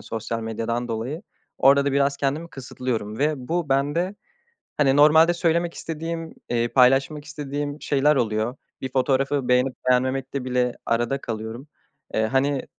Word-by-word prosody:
sosyal 115 +1 -4
medyadan 115 +2 -3
dolayı 125 - -4 0.4
orada 140 +1 +5
da 140 - 0
biraz 140 0 +2
kendimi 145 +5 -2
kısıtlıyorum 125 -5 -4
ve 150 +2 +2
bu 170 -2 -1
bende 145 +8 0 0.6
hani 135 -2 +3
normalde 160 +3 +6
söylemek 170 0 0
istediğim, 165 0 -5
eee, 120 0 0
paylaşmak 135 +4 +3
istediğim 145 0 -5
şeyler 145 +1 +2
oluyor. 110 +1 0 0.2
Bir 130 -1 -5
fotoğrafı 135 +1 +1
beğenip 125 +1 +3 0.2
beğenmemekte 130 +1 0
bile 125 -1 0
arada 120 +4 0
kalıyorum. 115 +4 -6 0.5
Eee, 110 - +2
hani 135 +3 0
135 Hz, 135 wpm, -24 LUFS, 125-145 Hz, 0.6 s, normalde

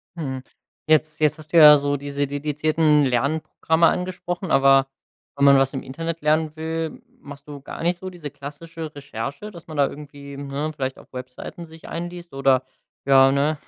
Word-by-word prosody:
Mhm. 135 -6 -5 0.5
Jetzt 155 0 +2
jetzt 155 0 +2
hast 155 -1 -14
du - - +5
ja 150 -2 +10
so 145 0 -1
diese 140 0 -3
dedizierten 150 +1 +1
Lernprogramme 155 +5 +1
angesprochen, 180 0 -3
aber 135 0 +5 0.5
wenn 140 - +2
man 140 0 +7
was 135 +1 +2
im 135 - -4
Internet 165 +5 -5
lernen 155 +1 +1
will, 160 0 -4 0.2
machst 140 0 -12
du 145 -2 -9
gar 140 - -8
nicht 175 +1 0
so 190 - -6
diese 170 -6 -8
klassische 155 +3 -8
Recherche, 140 - -6
dass 170 -3 -13
man 155 - -8
da 140 -1 +4
irgendwie, 140 -1 -10
ne, 140 +2 -4
vielleicht 130 -2 -4
auf - - -17
Webseiten 130 +7 -8
sich 160 0 -14
einliest 175 0 -7
oder 135 -1 +2 0.4
ja, 135 -1 +6
ne? 145 +3 +1
150 Hz, 175 wpm, -23 LUFS, 140-160 Hz, 0.5 s, ja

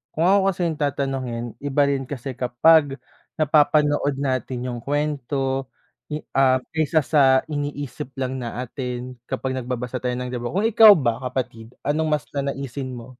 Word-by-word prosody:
kung 160 - +1
ako 195 +3 +5
kasi 185 - -4
'yung 160 -2 -4
tatanungin 135 -4 -2 0.2
iba 145 0 0
rin 135 -1 0
kasi 135 -1 -5
kapag 135 +4 +4 0.4
napapanood 145 -1 +3
natin 130 -2 -2
'yung 120 - -5
kwento, 135 -2 -1 0.7
ah, 130 -1 +4
kaysa 160 0 +2
sa 150 0 +3 0.3
iniisip 145 -3 -5
lang 130 0 -2
natin, 125 +1 -5
kapag 130 0 -3
nagbabasa 125 0 -4
tayo 125 0 -2
ng 125 0 -4
libro. 120 +5 -4
Kung 200 - +1
ikaw 220 -1 +8
ba 120 -6 0
kapatid, 120 -2 -5
anong 155 +2 0
mas 140 - -5
nanaisin 140 -2 -4
mo? 120 +1 -11
135 Hz, 145 wpm, -23 LUFS, 125-145 Hz, 0.7 s, ikaw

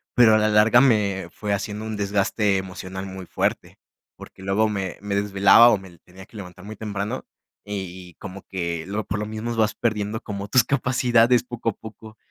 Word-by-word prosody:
Pero, 115 -3 +6
a 110 - +5
la 110 0 +2
larga, 110 +3 +5
me 100 -8 +2
fue 105 -1 -3
haciendo 105 +2 -4
un 110 -1 -4
desgaste 100 0 +1
emocional, 95 0 -6
muy 95 -1 -8
fuerte. - - -2 0.4
Porque - - -13
luego, 95 +3 +1
me 95 -4 -3
me 100 0 -4
desvelaba, 100 +3 +6
o 115 - +3
me 95 -3 -14
tenía 95 +3 -15
que 110 - -15
levantar 90 -1 -10
muy 110 +1 -8
temprano. 100 -1 -4 0.4
Y 95 -4 -7
como 100 +1 -9
que 85 -4 -4
lo 105 +1 -3
por 100 +2 -3
lo 105 - -3
mismo, 110 +2 -4
vas 110 -2 +1
perdiendo 110 -1 -1
como 100 -2 -6
tus 125 +3 +4
capacidades, 125 -2 +2
poco 120 -2 -3
a - - -3
poco. 110 +1 -12
105 Hz, 190 wpm, -23 LUFS, 95-110 Hz, 0.4 s, Pero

